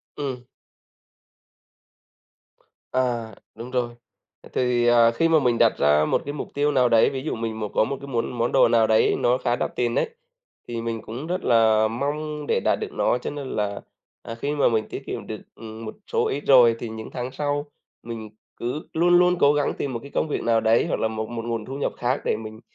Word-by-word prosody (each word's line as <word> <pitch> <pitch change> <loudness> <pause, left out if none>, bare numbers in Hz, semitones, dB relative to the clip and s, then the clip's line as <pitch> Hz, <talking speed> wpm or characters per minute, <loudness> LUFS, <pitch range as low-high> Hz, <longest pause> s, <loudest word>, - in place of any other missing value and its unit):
Ừm. 130 -4 -4 2.5
À, 120 -3 -1 0.2
đúng 120 +2 -8
rồi. 120 -2 -1 0.6
Thì, 120 -1 +1
à, 115 -1 +6
khi 165 +8 +1
mà 165 -1 +4
mình 125 -4 +1
đặt - - +3
ra 75 +1 +4
một - - +1
cái 145 - -4
mục 150 - -5
tiêu 145 +1 +1
nào 130 -3 +3
đấy, 115 -1 +5
ví 135 0 -5
dụ 155 - -2
mình 110 -1 -4
một 105 -1 -3
có - - +3
một 135 +5 -3
cái 140 - -8
muốn 120 -3 -2
món 115 +1 0
đồ - - +5
nào 115 -1 +3
đấy 110 0 +3
nó 125 +1 +3
khá 120 -2 0
đắt - - -3
tiền 120 -1 0
ấy, - - +1 0.6
thì 115 -1 -4
mình 115 -1 -3
cũng 120 +8 -7
rất 180 +2 -2
là 110 -1 +4
mong 150 +5 -3
để - - +2
đạt - - +1
được - - -5
nó. - - +1
Cho - - -5
nên 145 -2 -6
là, 100 -1 -2 0.4
à, 115 - -7
khi 140 +5 -3
mà 145 - +3
mình 110 -2 0
tiết - - -6
kiệm - - -6
được, - - -6
ừm, 110 0 -9
một 110 - -7 0.2
số - - +2
ít 145 - -3
rồi 120 -4 +7
thì 120 - -5
những 110 0 -7
tháng 125 0 -4
sau 145 +1 -2 0.4
mình 110 -2 -7 0.3
cứ 125 +6 -4
luôn 175 +2 +4
luôn 180 0 +4
cố 145 +1 +5
gắng 145 -1 0
tìm 135 -3 -3
một 115 - -3
cái 140 - -11
công - - 0
việc 150 - -2
nào 115 -1 +3
đấy 115 +1 +3
hoặc - - -1
là - - +1
một 110 0 -4
một 115 -1 -5
nguồn 115 -2 -3
thu 135 - -6
nhập 145 - -2
khác 125 +3 0
để - - +1
mình, 110 0 -9
120 Hz, 225 wpm, -24 LUFS, 115-140 Hz, 2.5 s, rồi